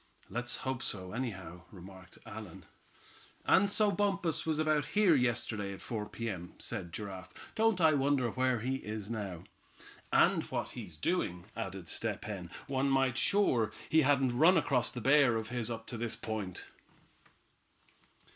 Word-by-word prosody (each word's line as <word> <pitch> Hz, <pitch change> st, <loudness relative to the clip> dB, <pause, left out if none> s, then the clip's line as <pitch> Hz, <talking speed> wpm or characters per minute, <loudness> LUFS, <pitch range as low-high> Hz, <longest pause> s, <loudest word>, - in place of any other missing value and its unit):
"Let's 120 Hz, +1 st, -2 dB
hope 130 Hz, -2 st, -1 dB
so, 95 Hz, -2 st, -4 dB
anyhow," 95 Hz, -8 st, -5 dB
remarked 95 Hz, -1 st, -12 dB
Allan. -, -, -9 dB, 0.8 s
"And 200 Hz, +1 st, +5 dB
so 210 Hz, 0 st, +3 dB
Bumpus 195 Hz, -6 st, 0 dB
was 155 Hz, -1 st, +1 dB
about 155 Hz, -2 st, +2 dB
here 205 Hz, -5 st, +6 dB
yesterday 110 Hz, -6 st, 0 dB
at 95 Hz, -, -9 dB
four 105 Hz, -3 st, -4 dB
P. 115 Hz, -, -5 dB
M.," 90 Hz, -5 st, -5 dB
said 95 Hz, -7 st, -4 dB
Giraffe, 95 Hz, -1 st, -8 dB
"Don't 225 Hz, -3 st, +2 dB
I 160 Hz, -2 st, +5 dB
wonder 135 Hz, -4 st, +2 dB
where 130 Hz, -2 st, +1 dB
he 130 Hz, +3 st, -1 dB
is 110 Hz, -2 st, -5 dB
now." 100 Hz, -7 st, -4 dB, 0.7 s
"And -, -, +5 dB
what -, -, -3 dB
he's 80 Hz, -3 st, -8 dB
doing," 90 Hz, -, -1 dB
added 95 Hz, -5 st, -5 dB
Step 105 Hz, +1 st, -2 dB
Hen. 95 Hz, -5 st, -5 dB, 0.2 s
"One 135 Hz, 0 st, 0 dB
thing 135 Hz, -1 st, +3 dB
sure, 120 Hz, -, +2 dB, 0.2 s
he 160 Hz, -, +5 dB
hadn't 135 Hz, -3 st, +3 dB
run 170 Hz, +4 st, +7 dB
across 140 Hz, -6 st, +2 dB
that 125 Hz, -, -6 dB
bear 135 Hz, -1 st, +5 dB
of 110 Hz, 0 st, -3 dB
his 120 Hz, -2 st, -2 dB
up 115 Hz, -1 st, -5 dB
to 115 Hz, -, -6 dB
this 115 Hz, 0 st, -2 dB
point." 105 Hz, -5 st, -5 dB
120 Hz, 155 wpm, -32 LUFS, 100-145 Hz, 0.8 s, run